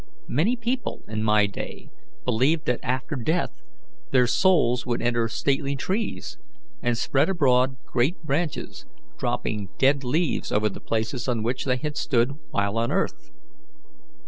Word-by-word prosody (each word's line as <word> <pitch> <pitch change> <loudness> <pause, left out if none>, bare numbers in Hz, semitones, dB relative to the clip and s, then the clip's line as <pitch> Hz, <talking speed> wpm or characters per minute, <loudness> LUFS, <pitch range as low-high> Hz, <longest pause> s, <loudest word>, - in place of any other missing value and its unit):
Many 180 - +2
people 245 +2 -3
in 110 0 -3
my 105 -1 +4
day 100 - -7 0.3
believed 145 +8 +2
that 125 - +1
after 130 +3 -2
death 155 - -1 0.5
their 125 -1 +4
souls 125 -2 +3
would 120 -2 -1
enter 120 -1 +1
stately 140 +4 0
trees, 185 - -3 0.4
and 120 -1 +1
spread 135 +7 +2
abroad 130 -7 +3
great 130 +9 +1
branches, 150 - -2 0.3
dropping 105 -3 -2
dead 135 +1 +3
leaves 155 +6 0
over 105 +1 +2
the - - -9
places 115 +3 -2
on 120 -3 0
which 120 +3 -1
they 130 -2 +2
had 150 +2 -4
stood 120 -1 +2 0.2
while 100 +2 0
on 115 +1 0
earth. - - -1
125 Hz, 145 wpm, -25 LUFS, 115-150 Hz, 0.5 s, my